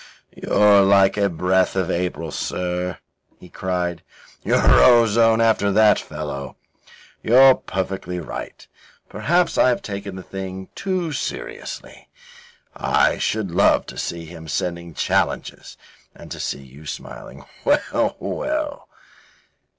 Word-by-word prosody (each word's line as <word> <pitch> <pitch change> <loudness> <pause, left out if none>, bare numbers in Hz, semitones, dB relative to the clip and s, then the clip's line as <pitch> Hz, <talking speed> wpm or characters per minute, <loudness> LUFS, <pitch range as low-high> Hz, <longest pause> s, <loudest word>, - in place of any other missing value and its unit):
"You're 105 -1 +4
like 95 0 +4
a 100 -1 +1
breath 90 +2 +1
of 95 -1 0
April, 85 -2 -3
sir," 90 +2 -3 0.4
he 90 - -14
cried. 90 -2 -3 0.4
"You're - - +4
ozone 115 -2 +5
after 110 -3 +2
that 105 +1 +5
fellow. 75 -3 -6 0.7
You're 130 +3 +7
perfectly 95 -4 -4
right. 85 - -8 0.4
Perhaps 175 +3 0
I - - +5
have 120 - -1
taken 100 -1 -6
the 95 - -8
thing 95 0 -7
too 185 -4 -2
seriously. 140 - -7 0.7
I - - +1
should 105 -4 -1
love 95 +4 +3
to - - -10
see 85 -1 -4
him 80 0 -11
sending 85 +3 -3
you 85 - -12
challenges - - -2 0.4
and - - -13
to - - -6
see 70 - -4
you 70 +4 -14
smiling. - - -9 0.2
Well, - - +1
well." 305 -1 -4
95 Hz, 125 wpm, -21 LUFS, 85-110 Hz, 0.7 s, You're